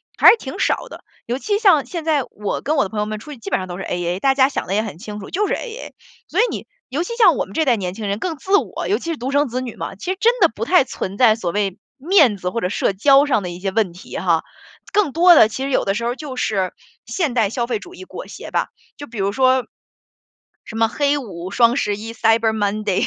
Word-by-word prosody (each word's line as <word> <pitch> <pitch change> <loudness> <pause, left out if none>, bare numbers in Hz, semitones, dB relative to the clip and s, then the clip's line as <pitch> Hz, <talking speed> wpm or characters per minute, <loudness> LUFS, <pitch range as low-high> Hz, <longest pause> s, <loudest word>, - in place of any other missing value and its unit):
还 - - +8
是 465 - +6
挺 - - -8
少 - - 0
的。 - - -12 0.2
尤其 275 - -1
像 380 -10 +4
现 340 -3 -5
在 310 -3 +2
我 210 -1 -4
跟 305 - 0
我 280 - +3
的 195 - -4
朋 215 - -4
友 210 - -1
们 215 0 -4
出 260 +8 -11
去 270 - -11
基 - - -7
本 - - +1
上 185 - -5
都 175 -1 -6
是 - - -4
A-A， 175 +1 -2
大 270 +5 +2
家 265 -1 +5
想 280 - -4
的 195 - -1
也 215 - +1
很 200 -7 -7
清 210 0 -7
楚， 200 - -10
就 415 +3 0
是 - - 0
A-A， - - -7 0.3
所 - - -2
以 - - +6
你 - - -6 0.2
尤 275 +5 -2
其 470 +6 -5
像 385 -9 +6
我 - - -1
们 195 - -14
这 320 - +2
一 - - -3
代 245 -4 +3
年 185 -2 -4
轻 215 -1 -5
人 200 +1 -2
更 335 +5 -3
自 390 +8 +2
我， - - -3
尤 415 - +1
其 - - -10
是 325 - -3
独 260 +2 -4
生 285 +1 +2
子 250 +1 -3
女 245 -3 -6
嘛， - - -6
其 280 - -4
实 380 - -3
真 480 +2 +3
的 - - +5
不 - - -5
太 360 -6 +5
存 195 -6 -6
在 225 -3 +5
所 185 -6 -3
谓 200 0 -1 0.2
面 300 - +4
子 180 -2 -3
或 230 - -3
者 - - 0
社 205 - 0
交 275 +8 +5
上 265 -8 +1
的 180 - -4
一 175 - -8
些 195 - -1
问 200 -4 0
题 180 - -9
哈。 170 -3 +1 0.5
更 405 -8 +2
多 350 +2 +7
的 220 - +7
其 245 +4 -5
实 275 - -2
有 - - +1
的 195 - +1
时 235 +3 -3
候 240 +1 -1
就 275 -2 -7
是 195 -7 -1 0.3
现 320 -9 -1
代 225 -5 +2
消 235 +2 -2
费 235 -3 -1
主 355 - -13
义 375 - -10
裹 - - -9
挟 - - -9
吧。 - - 0 0.3
就 290 - -8
比 235 - -10
如 195 +1 +1
说， 260 +2 +3 1.0
什 220 - -9
么 225 0 +3
黑 285 +4 +1
五、 185 -9 -6
双 235 +3 +4
十 205 -5 0
一、 225 +2 -7
Cyber 225 0 +2
Monday， 210 -2 0
235 Hz, 335 characters per minute, -20 LUFS, 205-290 Hz, 1.0 s, 还